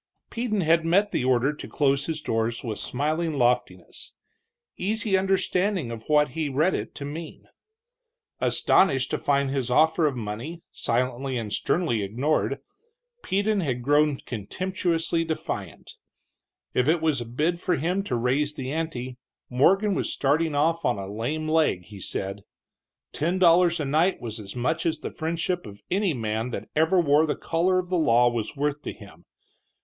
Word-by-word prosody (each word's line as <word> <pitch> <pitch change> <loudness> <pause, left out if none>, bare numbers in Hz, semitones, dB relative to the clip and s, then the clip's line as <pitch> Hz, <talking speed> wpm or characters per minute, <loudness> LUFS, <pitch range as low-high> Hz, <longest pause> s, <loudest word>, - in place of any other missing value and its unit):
Peden 230 -4 -1
had 165 0 +3
met 195 +5 +2
the - - 0
order 130 +2 +2
to 150 - -9
close 140 -1 +1
his 160 -2 -3
doors 115 -2 -1
with 110 -4 -4
smiling 155 +5 -1
loftiness, 125 -2 -1 0.6
easy 210 +1 0
understanding 190 - +1
of 115 -1 -7
what 150 -1 +4
he 155 +2 -2
read 155 +7 +2
it - - -4
to 140 - -6
mean. 155 +3 -7 0.9
Astonished 135 -9 +3
to - - -1
find 140 -1 +1
his 135 -3 -1
offer 160 +4 +4
of 140 - -2
money 120 +9 -6
silently 125 +2 -1
and 110 -3 -4
sternly 155 -11 0
ignored, 135 +6 -1 0.6
Peden 205 +2 0
had 130 -8 -2
grown 145 +1 +3
contemptuously 165 - -2
defiant. 160 -1 -5 0.8
If 125 +1 +2
it 165 +2 +3
was 155 -5 +1
a - - -4
bid 155 +9 -1
for 180 0 0
him 175 +7 0
to 125 - -1
raise 135 +5 0
the 135 -2 -4
ante, 130 -6 -4 0.3
Morgan 195 +11 +3
was - - -1
starting 150 +2 +1
off 165 +3 +1
on 125 - +1
a 100 - -5
lame 150 +9 -2
leg, 155 - +2
he 100 +2 -12
said. 100 +2 -4 0.7
Ten 170 +5 0
dollars 175 -1 +5
a 150 - -1
night 160 +7 +2
was 115 -2 -6
as 100 0 -8
much 155 +7 -1
as 160 -1 0
the - - -5
friendship 170 +1 -2
of 100 0 -12
any 190 -4 +1
man 110 0 -2
that - - -6
ever 160 +4 +3
wore 155 -1 +4
the 145 - 0
collar 175 +3 +1
of 180 -1 -2
the 180 -2 +1
law 120 -5 +4
was 120 +2 -2
worth 145 +1 -1
to - - -5
him. 85 -5 -15
150 Hz, 165 wpm, -25 LUFS, 125-170 Hz, 0.9 s, dollars